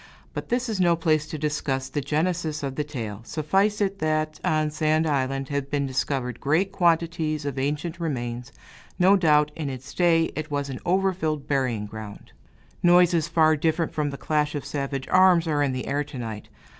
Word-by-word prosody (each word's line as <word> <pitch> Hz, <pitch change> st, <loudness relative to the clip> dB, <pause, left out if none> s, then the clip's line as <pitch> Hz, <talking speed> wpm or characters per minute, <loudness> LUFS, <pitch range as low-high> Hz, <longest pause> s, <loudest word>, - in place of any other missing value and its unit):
But -, -, -6 dB
this 250 Hz, +1 st, 0 dB
is 215 Hz, -4 st, -1 dB
no 170 Hz, -1 st, +4 dB
place 155 Hz, -2 st, +1 dB
to 155 Hz, -, -5 dB
discuss 145 Hz, -3 st, -2 dB
the 145 Hz, +2 st, -3 dB
genesis 155 Hz, +1 st, -1 dB
of 135 Hz, -1 st, -2 dB
the 150 Hz, -, -2 dB
tale. 115 Hz, -8 st, -6 dB
Suffice 195 Hz, -, 0 dB
it, 195 Hz, -1 st, 0 dB
that 155 Hz, -1 st, -1 dB
on 155 Hz, -1 st, +1 dB
Sand 155 Hz, +1 st, +1 dB
Island 135 Hz, -2 st, -1 dB
have 140 Hz, -1 st, -2 dB
been 140 Hz, -1 st, 0 dB
discovered 130 Hz, -1 st, -2 dB
great 165 Hz, +7 st, +1 dB
quantities 165 Hz, -4 st, +1 dB
of 140 Hz, -2 st, -3 dB
ancient 150 Hz, +5 st, -2 dB
remains. 125 Hz, -5 st, -4 dB, 0.5 s
No 190 Hz, +3 st, +5 dB
doubt, 150 Hz, -5 st, +3 dB
in 150 Hz, -3 st, -3 dB
its 130 Hz, -1 st, -8 dB
day, 165 Hz, -2 st, +3 dB
it 155 Hz, 0 st, -4 dB
was 140 Hz, -1 st, -2 dB
an 130 Hz, -, -6 dB
over 190 Hz, +2 st, +2 dB
filled 155 Hz, -5 st, -3 dB
burying 130 Hz, -7 st, 0 dB
ground. 105 Hz, -1 st, -9 dB, 0.5 s
Noises, 175 Hz, -2 st, +4 dB
far 160 Hz, -2 st, +4 dB
different 160 Hz, +2 st, 0 dB
from 150 Hz, -1 st, -1 dB
the 140 Hz, -, -6 dB
clash 150 Hz, 0 st, 0 dB
of 145 Hz, -, -4 dB
savage 140 Hz, -2 st, -3 dB
arms, 185 Hz, -2 st, +5 dB
are 150 Hz, -2 st, +1 dB
in 140 Hz, -2 st, +2 dB
the 130 Hz, 0 st, -4 dB
air 145 Hz, +1 st, 0 dB
to 145 Hz, -2 st, -9 dB
night. 110 Hz, -3 st, -6 dB
150 Hz, 190 wpm, -25 LUFS, 135-165 Hz, 0.5 s, No